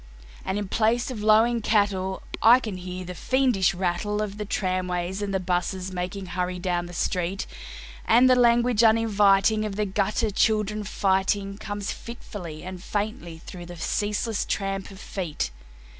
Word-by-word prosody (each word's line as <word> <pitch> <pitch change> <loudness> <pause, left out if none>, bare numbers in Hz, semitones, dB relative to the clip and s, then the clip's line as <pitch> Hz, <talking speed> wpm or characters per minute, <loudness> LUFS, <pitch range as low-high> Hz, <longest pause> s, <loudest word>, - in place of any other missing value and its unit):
And 190 - -2
in 205 -1 -3
place 230 +5 +1
of 225 -5 -5
lowing 225 +2 +4
cattle, 200 -3 +1 0.2
I 235 +3 +8
can 215 -7 -5
hear 180 0 -6
the 180 - -6
fiendish 230 -5 +2
rattle 185 +3 -1
Of 205 0 -6
the 210 - -3
tramways 185 -1 -2
and 205 -1 -2
the 190 - 0
buses 180 +1 -2
making 185 +2 -4
hurry 180 0 -2
down 175 -1 -1
the 175 - -10
street; 180 +2 -1 0.6
And 240 +3 +6
the 255 - +6
language 240 -1 +4
uninviting 215 -1 +4
of 210 -2 -3
the 210 +1 0
gutter 205 +3 0
children 215 0 +1
fighting 195 0 0
Comes 205 -2 -4
fitfully 180 -9 -8
and 185 0 -7
faintly 200 -6 -4
through 175 -2 -9
the 175 0 -9
ceaseless 210 +5 -1
tramp 195 -1 -2
of 195 -1 -12
feet. 165 - -4
195 Hz, 160 wpm, -25 LUFS, 185-215 Hz, 0.6 s, I